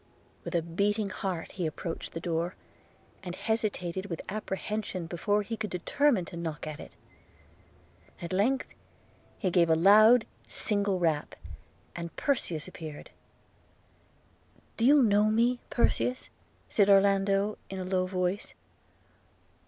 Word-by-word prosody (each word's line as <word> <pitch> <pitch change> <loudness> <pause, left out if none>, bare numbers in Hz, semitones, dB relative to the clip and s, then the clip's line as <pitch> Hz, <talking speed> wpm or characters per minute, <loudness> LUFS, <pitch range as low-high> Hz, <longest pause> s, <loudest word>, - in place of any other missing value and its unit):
With - - -5
a 170 - +2
beating 200 +4 0
heart 185 -4 -4
he 180 -3 -2
approached 165 +2 -6
the 165 - -4
door, 170 +1 -2 0.7
and 180 -2 -6
hesitated 195 -5 -2
with 165 -4 -5
apprehension 205 -2 -3
before 205 +5 0
he 225 +3 -4
could 215 -1 -4
determine 215 +3 +1
to 170 - -10
knock 165 -2 -5
at 155 -1 -6
it. - - -11 1.2
At 170 +1 -5
length 250 +8 +2 0.7
he 185 -5 -1
gave 170 -1 +4
a 160 - +5
loud 215 +7 +7 0.2
single 200 -2 0
rap, 160 -4 0 0.6
and 170 -1 -6
Perseus 180 - -1
appeared. 155 -5 -9 0.8
– - - -34
'Do 230 - +1
you 285 +1 +6
know 210 -2 +4
me, 235 +3 +2
Perseus?' 250 +1 0 0.4
said 205 -2 +3
Orlando, 195 +1 +3
in 195 - -5
a 185 - -3
low 185 0 0
voice. 185 +2 -2
195 Hz, 130 wpm, -29 LUFS, 170-215 Hz, 1.2 s, loud